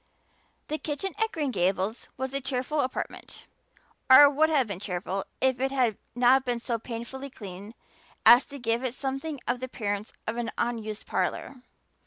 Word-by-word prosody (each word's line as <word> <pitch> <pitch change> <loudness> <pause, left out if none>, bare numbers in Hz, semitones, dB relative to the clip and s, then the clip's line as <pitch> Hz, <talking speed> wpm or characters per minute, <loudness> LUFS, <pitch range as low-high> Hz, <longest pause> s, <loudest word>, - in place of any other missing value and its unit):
The 310 +1 -2
kitchen 315 +5 -3
at 445 - +2
Green 295 -4 -1
Gables 190 +2 -1
was 265 +1 -3
a 275 - -1
cheerful 265 +3 -2
apartment 255 -2 -4 0.6
or 275 +3 +11
would 310 +2 +3
have 290 -5 +3
been 200 -4 -6
cheerful 190 0 -3
if 260 -1 +2
it 265 +1 +1
had 255 -5 +1 0.2
not 250 +2 +5
been 245 -2 -1
so 235 -1 -2
painfully 240 +4 -6
clean 200 -1 -9 0.5
as 240 +4 +9
to 280 - -9
give 235 -1 -1
it 255 -1 -2
something 270 +2 -3
of 245 +1 0
the 255 - -4
appearance 205 -4 -3
of 225 +1 -3
an 235 -1 -2
unused 220 -3 -3
parlor. 260 - -2
250 Hz, 170 wpm, -27 LUFS, 220-270 Hz, 0.6 s, or